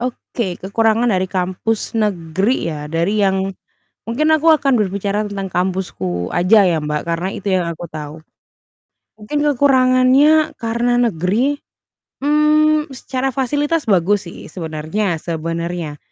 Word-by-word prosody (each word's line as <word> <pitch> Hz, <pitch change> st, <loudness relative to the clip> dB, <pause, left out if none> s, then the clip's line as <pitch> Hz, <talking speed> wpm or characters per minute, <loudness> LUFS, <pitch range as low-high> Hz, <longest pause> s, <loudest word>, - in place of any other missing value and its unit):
Oke, 235 Hz, -5 st, -4 dB
kekurangan 225 Hz, +4 st, +1 dB
dari 185 Hz, -1 st, +1 dB
kampus 190 Hz, +5 st, -2 dB
negeri 190 Hz, 0 st, 0 dB
ya, 150 Hz, -1 st, -6 dB
dari 170 Hz, +7 st, 0 dB
yang 190 Hz, 0 st, 0 dB, 0.6 s
mungkin 300 Hz, +7 st, +1 dB
aku 315 Hz, +1 st, +2 dB
akan 275 Hz, -2 st, 0 dB
berbicara 200 Hz, +1 st, -1 dB
tentang 195 Hz, -1 st, -4 dB
kampusku 175 Hz, -, -2 dB
aja 195 Hz, +4 st, +4 dB
ya 170 Hz, -3 st, +2 dB
Mbak, 150 Hz, 0 st, -2 dB
karena 170 Hz, +2 st, -2 dB
itu 200 Hz, -, -5 dB
yang 180 Hz, -2 st, +1 dB
aku 170 Hz, +1 st, -6 dB
tahu. 150 Hz, -1 st, -7 dB, 1.0 s
Mungkin 220 Hz, +8 st, -3 dB
kekurangannya 270 Hz, +2 st, +4 dB
karena 235 Hz, +1 st, 0 dB
negeri, 225 Hz, -, +1 dB, 0.7 s
mmm, 300 Hz, +1 st, +3 dB
secara 255 Hz, +1 st, -3 dB
fasilitas 290 Hz, +4 st, 0 dB
bagus 195 Hz, +2 st, +2 dB
sih -, -, -11 dB
sebenarnya 165 Hz, +2 st, -3 dB
sebenarnya. 165 Hz, -1 st, -4 dB
200 Hz, 125 wpm, -18 LUFS, 170-255 Hz, 1.0 s, aja